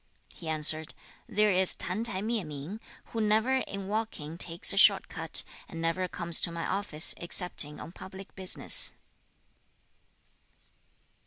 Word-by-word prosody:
He 165 Hz, -, -9 dB
answered, 155 Hz, 0 st, +3 dB, 0.3 s
'There 210 Hz, -1 st, +1 dB
is 185 Hz, 0 st, +2 dB
Tan 185 Hz, +5 st, -2 dB
t'ai 200 Hz, -4 st, -3 dB
Mieh 225 Hz, -2 st, -2 dB
ming, 150 Hz, +7 st, -9 dB, 0.3 s
who 225 Hz, -, -3 dB
never 220 Hz, +5 st, +1 dB
in 200 Hz, -6 st, -6 dB
walking 205 Hz, -8 st, -5 dB
takes 170 Hz, +3 st, +3 dB
a -, -, -6 dB
short 200 Hz, -1 st, +5 dB
cut, 165 Hz, -2 st, 0 dB, 0.3 s
and 165 Hz, -, -9 dB
never 165 Hz, +3 st, -2 dB
comes 170 Hz, -2 st, -6 dB
to 170 Hz, -, -1 dB
my 170 Hz, 0 st, -6 dB
office, 190 Hz, -5 st, +1 dB
excepting 170 Hz, -4 st, +2 dB
on -, -, -10 dB
public 190 Hz, +2 st, -12 dB
business.' 190 Hz, -1 st, +2 dB
185 Hz, 140 wpm, -28 LUFS, 165-210 Hz, 0.3 s, short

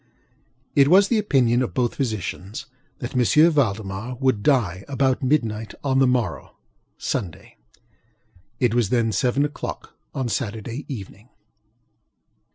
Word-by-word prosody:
It 140 Hz, -1 st, +5 dB
was 195 Hz, +5 st, +6 dB
the 230 Hz, -, +3 dB
opinion 130 Hz, -, +2 dB
of 130 Hz, -, -3 dB
both 125 Hz, -3 st, +1 dB
physicians 110 Hz, -, -4 dB, 0.3 s
that 120 Hz, +1 st, -6 dB
M. 150 Hz, +7 st, +5 dB
Valdemar 110 Hz, -4 st, -1 dB
would 130 Hz, -4 st, +1 dB
die 100 Hz, -, +1 dB
about 135 Hz, -1 st, +1 dB
midnight 115 Hz, -6 st, 0 dB
on 135 Hz, -2 st, +2 dB
the 135 Hz, -, +5 dB
morrow 125 Hz, -4 st, -1 dB, 0.4 s
(Sunday). 100 Hz, -, -4 dB, 1.0 s
It 120 Hz, -3 st, +2 dB
was 120 Hz, -5 st, +2 dB
then 115 Hz, -2 st, +2 dB
seven 135 Hz, +5 st, +1 dB
oŌĆÖclock 145 Hz, -, -7 dB, 0.3 s
on 130 Hz, -2 st, -1 dB
Saturday 115 Hz, +2 st, -4 dB
evening. 110 Hz, -2 st, -8 dB
125 Hz, 125 wpm, -23 LUFS, 110-135 Hz, 1.0 s, was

